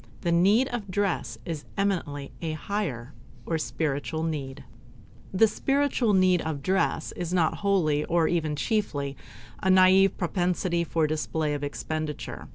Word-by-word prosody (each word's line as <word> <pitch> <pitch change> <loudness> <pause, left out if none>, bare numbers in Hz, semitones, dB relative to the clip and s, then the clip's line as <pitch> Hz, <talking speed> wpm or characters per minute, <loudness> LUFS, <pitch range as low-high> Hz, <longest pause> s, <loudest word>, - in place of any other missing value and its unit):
The 170 - 0
need 200 +9 +4
of 225 -5 -5
dress 180 - -1
is 160 -3 -5
eminently 170 -8 -1
a 160 -2 -2
"higher" 150 - -4 0.3
or 165 -1 -1
spiritual 155 +1 -2
need. 140 -4 -4 0.7
This 210 +3 +3
spiritual 270 -5 +1
need 185 -2 +4
of 150 -3 -4
dress 185 -2 0
is 175 -1 -5
not 175 -3 +2
wholly, 170 -7 +1
nor 165 -1 +3
even 160 -3 0
chiefly, 145 -6 -1 0.5
a 190 - +1
naive 185 +1 +6
propensity 175 -1 0
for 165 -1 0
display 155 0 -1
of 145 0 -4
expenditure. 155 +1 -4
170 Hz, 140 wpm, -27 LUFS, 150-190 Hz, 0.7 s, naive